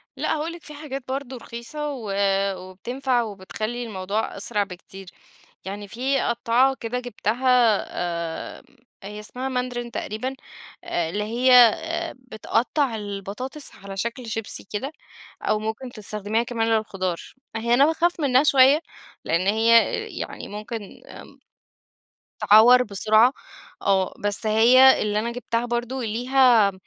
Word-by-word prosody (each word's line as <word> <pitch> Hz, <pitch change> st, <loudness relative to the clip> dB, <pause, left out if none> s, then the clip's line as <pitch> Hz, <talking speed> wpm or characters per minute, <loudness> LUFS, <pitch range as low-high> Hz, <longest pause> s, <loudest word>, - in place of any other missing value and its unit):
لأ -, -, -1 dB
هاقول 310 Hz, +2 st, -3 dB
لِك 340 Hz, -, -12 dB
في 300 Hz, -, -11 dB
حاجات 280 Hz, -3 st, -7 dB
برضه 265 Hz, -1 st, -4 dB
رخيصة 265 Hz, +6 st, -6 dB
و 220 Hz, -6 st, -6 dB, 0.5 s
وبتنفَع 240 Hz, +8 st, -2 dB
وبتخلّي 215 Hz, +3 st, -5 dB
الموضوع 210 Hz, 0 st, -3 dB
أسرع 210 Hz, -3 st, 0 dB
بكتير، 190 Hz, 0 st, -11 dB, 0.6 s
يعني 200 Hz, +1 st, -6 dB
في 260 Hz, +6 st, -1 dB
قطّاعة 245 Hz, +3 st, +2 dB
كده 240 Hz, +2 st, -3 dB
جبتها 245 Hz, -1 st, +2 dB, 0.8 s
آمم 275 Hz, +1 st, -28 dB, 0.3 s
هي 210 Hz, +1 st, -7 dB
اسمها 250 Hz, +5 st, -5 dB
ماندرين 250 Hz, -2 st, -3 dB
تقريبًا، 255 Hz, +7 st, -4 dB, 0.5 s
اللي 175 Hz, +5 st, -2 dB
هي 240 Hz, +4 st, +1 dB
آآ 325 Hz, +8 st, +4 dB
بتقطّع 250 Hz, +2 st, -1 dB
البطاطس 210 Hz, +7 st, -6 dB
على 195 Hz, 0 st, -9 dB
شكْل 235 Hz, +4 st, -3 dB
شيبسي 225 Hz, -1 st, -4 dB
كده، 270 Hz, +8 st, -3 dB, 0.5 s
أو 215 Hz, -, 0 dB
ممكن 220 Hz, +4 st, -5 dB
تستخدميها 215 Hz, 0 st, -2 dB
كمان 230 Hz, -2 st, -2 dB
للخضار، 195 Hz, -6 st, -1 dB, 0.4 s
هيّ 235 Hz, +2 st, 0 dB
أنا 275 Hz, +4 st, +6 dB
باخاف 335 Hz, +2 st, +1 dB
منها 275 Hz, -2 st, +3 dB
شويّة 275 Hz, +2 st, +5 dB, 0.4 s
لإن 170 Hz, +4 st, 0 dB
هيّ 225 Hz, +2 st, +3 dB, 0.5 s
يعني -, -, -6 dB
ممكن 210 Hz, 0 st, -8 dB
آمم -, -, -11 dB, 1.2 s
تعوَّر 240 Hz, +4 st, +8 dB
بسرعة، 215 Hz, +3 st, +3 dB, 0.5 s
آه 190 Hz, -1 st, +1 dB
بس 205 Hz, +2 st, 0 dB
هيّ 245 Hz, +5 st, +6 dB
اللي 210 Hz, 0 st, 0 dB
أنا 235 Hz, +2 st, -2 dB
جبتها 240 Hz, -1 st, -2 dB
برضه 240 Hz, +2 st, -3 dB
ليها 235 Hz, -2 st, +3 dB
235 Hz, 125 wpm, -23 LUFS, 210-255 Hz, 1.2 s, تعوَّر